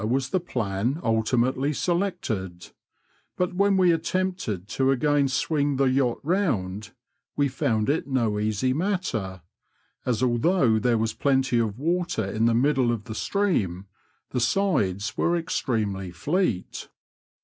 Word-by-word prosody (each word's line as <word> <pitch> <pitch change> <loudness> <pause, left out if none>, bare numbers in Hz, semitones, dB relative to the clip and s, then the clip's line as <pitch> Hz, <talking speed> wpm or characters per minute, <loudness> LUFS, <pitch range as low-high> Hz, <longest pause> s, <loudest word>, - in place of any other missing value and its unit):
was 130 +1 0
the 185 - +1
plan 120 - -2
ultimately 125 +5 +1
selected; 145 - -2 0.7
but 180 0 0
when 200 +1 +3
we 180 -2 +5
attempted 165 - -2
to 130 +3 0
again 140 +1 +2
swing 145 +2 0
the 135 - +2
yacht 130 -2 +1
round, 120 - -1 0.5
we 145 -1 +2
found 110 -4 0
it 150 +1 0
no 115 -6 0
easy 110 +4 0
matter, 135 - -2 0.6
as 125 -1 0
although 120 -1 +3
there 120 +1 +2
was 110 0 -1
plenty 135 -3 +1
of 110 -2 -1
water 170 - -1
in 110 +3 0
the 115 -1 +3
middle 130 -1 +2
of 115 -3 -3
the 110 - -7
stream, 105 - -1 0.5
the - - -1
sides 120 - 0
were 170 0 +2
extremely 105 - -2
fleet. 115 - -2
130 Hz, 135 wpm, -25 LUFS, 110-165 Hz, 0.7 s, we